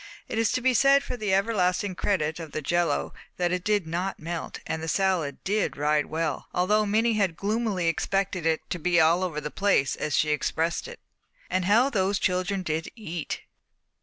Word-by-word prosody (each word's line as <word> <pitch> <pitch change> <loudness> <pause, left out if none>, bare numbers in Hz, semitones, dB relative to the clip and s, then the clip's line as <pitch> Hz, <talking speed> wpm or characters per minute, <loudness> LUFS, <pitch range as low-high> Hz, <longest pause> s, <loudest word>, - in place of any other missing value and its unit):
It 225 - -2
is 225 - +2
to 255 - 0
be 260 +1 +3
said 275 +3 +5
for 250 - -4
the 215 -4 -2
everlasting 195 -1 +1
credit 165 -4 -1
of 160 -3 -8
the 155 - -2
jello 175 +4 0 0.2
that 175 -1 +1
it 180 -1 -1
did 205 -3 +1
not 175 +4 -3
melt, 170 +1 -5
and 160 - -3
the 160 - -4
salad 180 -6 0
did 205 +2 0
ride 150 +1 +1
well, 160 -3 -2
although 210 +4 +2
Minnie 225 +3 +2
had 195 -6 +1
gloomily 205 -3 -1
expected 190 +2 0
it 160 -1 0
to 175 - -2
be 175 +2 +2
"all 165 +3 +4
over 165 -5 -2
the 150 0 -5
place" 195 -9 +2
as 150 -2 -1
she 155 - +2
expressed 160 - -1
it. 485 0 -11 0.5
How 210 +9 +3
those 195 -2 +1
children 185 +1 0
did 160 -1 -2
eat! 175 -8 -5
180 Hz, 190 wpm, -26 LUFS, 160-205 Hz, 0.5 s, said